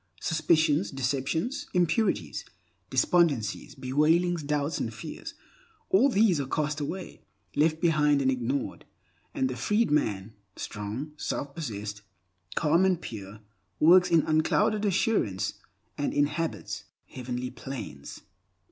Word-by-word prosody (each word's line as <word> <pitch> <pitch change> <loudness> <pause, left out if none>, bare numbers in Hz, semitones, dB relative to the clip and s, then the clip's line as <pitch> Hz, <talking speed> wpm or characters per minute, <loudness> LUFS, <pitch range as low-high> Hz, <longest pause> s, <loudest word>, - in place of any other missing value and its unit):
Suspicions, 160 0 +2
deceptions, 145 - -2
impurities, 180 - +1 0.5
despondencies, 135 -5 +1
bewailings, 155 +6 +2
doubts, 145 +1 -1
and - - -2
fears—all 435 - -2
these 200 - +3
are 135 - -4
cast 150 +1 -1
away, 175 +5 -5 0.3
left 155 +2 +2
behind 150 -4 +3
and 130 -1 +2
ignored, 130 +2 -2 0.5
and 130 - +1
the 130 - -4
freed 210 - +1
man, 110 -8 0 0.2
strong, 110 +9 -5
self 140 -1 -3
possessed, 105 -9 -5 0.5
calm, 165 +3 +3
and 185 -3 +3
pure, 105 - -8 0.4
works 180 +3 +6
in 165 -3 +4
unclouded 160 +7 +2
assurance, 190 - +1 0.5
and 145 - -1
inhabits 150 +3 -1 0.2
heavenly 125 0 -5
planes. 120 - -8
150 Hz, 110 wpm, -28 LUFS, 130-175 Hz, 0.5 s, works